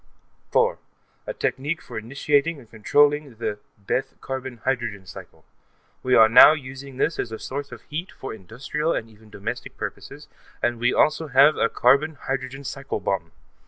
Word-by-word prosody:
4.) - - +2 0.5
A - - -3
technique 145 +5 -2
for - - -12
initiating 140 +7 0
and 120 -5 -16
controlling 145 +4 +2
the 105 -2 -4 0.2
Bethe 130 +6 -3
carbon 130 -2 -5
hydrogen 120 -7 -2
cycle. - - -12 0.6
We 130 0 +2
are 110 - +8
now 120 +6 +9
using 135 -2 -8
this 160 - 0
as 115 - -2
a 110 - -5
source 140 +4 -6
of - - -10
heat 165 +5 -6
for 135 - -7
industrial 125 - -3
and 110 - -3
even 110 0 -19
domestic 100 -2 -6
purposes, - - -7 0.3
and 120 -1 -1
we 120 +1 +2
also 155 +1 +2
have 140 +2 +6
a 115 - +1
carbon 140 +5 +3
hydrogen 135 0 -4
cycle 135 0 -4
bomb. 90 -4 -2
130 Hz, 160 wpm, -24 LUFS, 115-145 Hz, 0.6 s, now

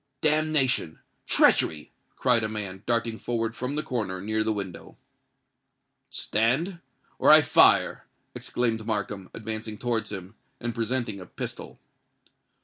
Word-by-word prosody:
"Damnation!—treachery!" 145 - +1 0.2
cried 125 -3 +2
a 110 - 0
man, 100 -3 -4
darting 115 -1 0
forward 115 -1 -2
from 130 +3 -4
the 150 - -1
corner 105 -8 -3
near 110 +3 -1
the 110 - 0
window. 100 -4 -6 1.1
"Stand—or 145 - -1
I - - +10
fire!" - - +4 0.3
exclaimed 115 -3 -2
Markham, 105 -3 -3
advancing 110 -1 -4
towards 115 -3 -1
him, 95 -1 -7 0.3
and 120 0 -3
presenting 115 -2 -1
a 90 - -10
pistol. - - -7
115 Hz, 115 wpm, -26 LUFS, 105-125 Hz, 1.1 s, I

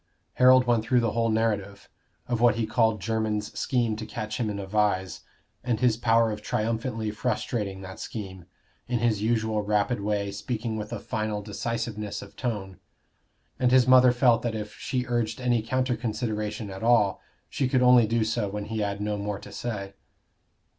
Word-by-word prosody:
Harold 130 0 +6
went 120 -2 +2
through 125 +2 +3
the 115 -2 +1
whole 115 0 +1
narrative 105 -3 -1 0.4
of 120 -2 -1
what 120 -3 +5
he 115 -1 0
called 110 -1 +2
Jermyn's 110 -2 -1
scheme 120 -4 0
to 110 - -5
catch 110 +2 -5
him 115 -3 0
in 105 - -3
a 100 - -5
vise, 95 -2 0 0.4
and 120 -3 0
his 120 -2 +3
power 115 0 +3
of 105 0 -5
triumphantly 110 +1 -2
frustrating 105 -3 -2
that 95 0 -9
scheme 95 -5 -7 0.4
in 125 - 0
his 115 -3 +1
usual 110 -1 +1
rapid 105 +3 0
way, 100 -1 -1
speaking 110 +3 -3
with 105 0 -5
a 120 - -3
final 105 0 -3
decisiveness 105 0 -4
of 100 - -14
tone; 100 -6 -4 0.8
and 125 - +3
his 130 -1 +5
mother 130 -1 +7
felt 120 -2 +3
that 115 -2 -2
if 105 -1 -5
she 125 -1 -3
urged 120 -1 -1
any 120 -2 +1
counter 130 +2 0
consideration 110 -2 -3
at 95 - -8
all, 115 -4 +3 0.3
she 135 - -1
could 130 0 +2
only 125 -2 +6
do 115 0 +1
so 110 -1 -1
when 105 +1 -4
he 110 +1 -4
had 100 -1 -2
no 105 0 -2
more 100 0 -3
to - - -12
say. 100 -5 -5
110 Hz, 180 wpm, -26 LUFS, 105-120 Hz, 0.8 s, mother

